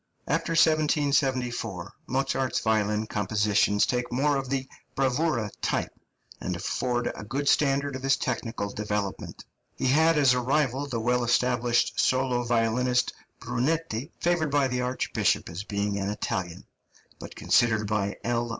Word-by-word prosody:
After 165 - 0
1774, 140 - +1
Mozart's 130 0 0
violin 110 -1 +1
compositions 105 -1 +1
take 125 -1 -2
more 140 +4 +2
of 135 -1 -3
the 135 -1 -2 0.3
bravura 135 -4 0
type, - - -1 0.5
and 90 - -3
afford 120 +7 -1
a - - -8
good 135 +6 -3
standard 140 -1 +2
of 130 - -6
his 135 0 +2
technical 115 -4 -3
development. 105 -2 -4 0.3
He - - -3
had 160 +5 +4
as 135 -4 +5
a 125 - +1
rival 135 +1 0
the 120 -4 -3
well 125 +2 +1
established 120 0 +1
solo 130 -1 +2
violinist, 120 +1 +1 0.3
Brunetti, 145 0 -2
favoured 175 -3 +1
by 140 -1 +2
the 125 0 -1
archbishop 125 +1 0
as 85 +4 -6
being 100 -1 -2
an 100 0 -2
Italian, 95 -4 -4 0.5
but - - -9
considered 110 -3 +2
by 100 -1 -1
L. 120 0 -1
125 Hz, 140 wpm, -27 LUFS, 110-135 Hz, 0.5 s, as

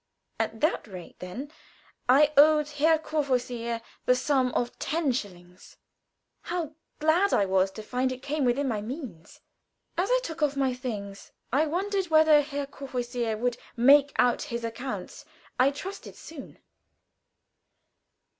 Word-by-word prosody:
At 225 0 -2
that 310 -6 +1
rate 185 -4 -10
then, 245 +11 -7 0.6
I 290 +4 +6
owed 300 +1 +6
Herr 305 +2 +3
Courvoisier 250 -7 -2 0.2
the 250 - +5
sum 255 -1 +1
of 240 0 -2
ten 310 -2 0
shillings. 180 -6 -7 0.6
How 340 -3 -4 0.2
glad 335 +6 +3
I 200 - +3
was 190 0 +2
to 215 - -8
find 255 +4 -1
it 255 +1 -7
came 290 +1 -1
within 260 +3 +1
my 220 -5 -1
means. 225 - -8 0.6
As 375 - +1
I - - +4
took 325 -6 -6
off 295 -2 +2
my 265 -2 +1
things, 210 -6 -6 0.2
I 300 +4 +3
wondered 385 +4 -1
when 315 -1 +5
Herr 295 -2 +3
Courvoisier 245 -4 -3
would 245 +1 -1 0.2
"make 280 +4 +6
out 245 -1 +3
his 235 -5 -4
accounts." 230 +3 -5 0.4
I 260 +2 +6
trusted 375 +8 -8
soon. 310 -4 -11
265 Hz, 140 wpm, -27 LUFS, 235-300 Hz, 0.6 s, I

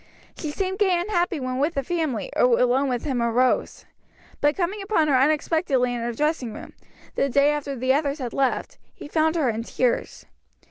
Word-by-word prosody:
She 310 - -5
seemed 380 +5 -3
gay 375 -4 +3
and 370 +5 -4
happy 350 -3 0
when 255 -1 -3
with 305 +4 0
the 275 - -1
family, 300 - -2
or 245 -1 +4
alone 255 +3 +2
with 245 -2 -2
him 260 -5 -1
or 235 0 +1
Rose; 250 +2 +1 0.5
but 295 +1 +2
coming 385 +3 -1
upon 390 -6 +1
her 275 - +4
unexpectedly 280 -2 +2
in 240 - -3
her 235 +1 -2
dressing 265 -3 -1
room, - - -10 0.4
the 275 - 0
day 280 +3 +4
after 290 -2 -3
the 260 +1 +1
others 285 0 0
had 250 -5 -5
left, 270 -2 -1 0.2
he - - -10
found 315 +1 +1
her 310 -6 +1
in 220 +1 -4
tears. 240 +1 -2
280 Hz, 200 wpm, -24 LUFS, 250-320 Hz, 0.5 s, or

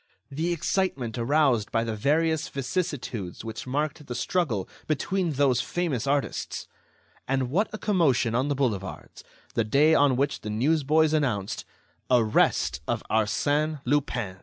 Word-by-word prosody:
The 160 +5 -1
excitement 150 - -1
aroused 130 -3 +2
by 115 0 +1
the 115 -1 -3
various 155 +7 +1
vicissitudes 130 - -3
which 115 +3 -6
marked 145 +2 -2
the 120 - -4
struggle 125 - -1 0.2
between 170 +3 0
those 135 -3 +3
famous 155 -9 -2
artists! 140 0 -1 0.6
And 130 -1 0
what 200 +8 +1
a 215 - -5
commotion 160 - +2
on 130 +4 +1
the 145 - 0
boulevards, 105 -9 -3 0.3
the 115 - +1
day 140 +8 +4
on 145 -4 +4
which 140 +2 0
the 105 - -5
newsboys 155 +6 +2
announced: 115 -10 -1 0.4
"Arrest 105 - +2
of - - -1
Arsène 145 +8 +1
Lupin!" 120 -10 -1
140 Hz, 135 wpm, -26 LUFS, 115-155 Hz, 0.6 s, day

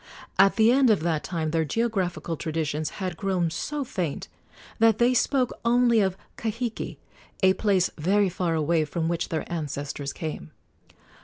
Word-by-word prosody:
At 195 0 +6
the 220 +1 +5
end 260 -1 +4
of 210 -7 +3
that 160 -2 0
time 160 -3 -2
their 165 0 +1
geographical 180 -2 -1
traditions 155 -1 -2
had 185 -3 -3
grown 180 -3 0
so 290 - -3
faint 180 - -3 0.5
that 225 -1 +5
they 245 +2 +4
spoke 255 0 +1
only 235 0 +4
of 190 -2 +1 0.2
Kahiki, 230 +1 -3 0.5
a 190 0 +6
place 190 -3 +1
very 200 +6 +3
far 175 -2 -1
away, 160 +1 +2
from 160 +2 -2
which 170 0 -1
their 160 -2 -2
ancestors 145 -3 -4
came. 155 - -6
180 Hz, 155 wpm, -26 LUFS, 160-220 Hz, 0.5 s, At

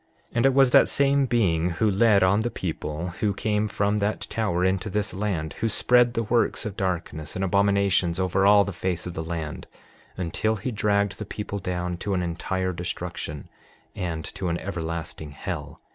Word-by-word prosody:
And 120 +3 +3
it 135 - +3
was 135 -2 +5
that - - +7
same 140 -1 +3
being 90 -9 +2
who 110 - +2
led 100 0 +4
on 95 +3 +4
the 115 +2 0
people 80 -3 -4
who 105 -2 +1
came 105 0 0
from 105 0 0
that 105 +1 -1
tower 90 -5 -1
into 95 +3 0
this 105 0 -1
land; 95 -6 -2
who 115 - +1
spread 120 +2 +3
the 115 - +1
works 120 +2 +1
of 105 -2 -4
darkness 85 -6 -3
and 95 - 0
abominations 100 -2 +2
over 95 +1 +1
all 100 +1 +7
the 100 - -5
face 90 -1 -2
of 90 - -5
the 80 - -4
land, 80 -2 -5 0.5
until 95 +5 0
he 110 +5 -4
dragged 100 -2 +1
the - - -3
people 100 0 -5
down 90 -1 -3
to 100 +2 -2
an 90 - 0
entire 95 +2 -2
destruction, 85 -4 -5 0.5
and 85 -5 -3
to 95 - -5
an 85 - 0
everlasting 80 -5 -5
hell. - - -6
95 Hz, 185 wpm, -25 LUFS, 85-105 Hz, 0.5 s, that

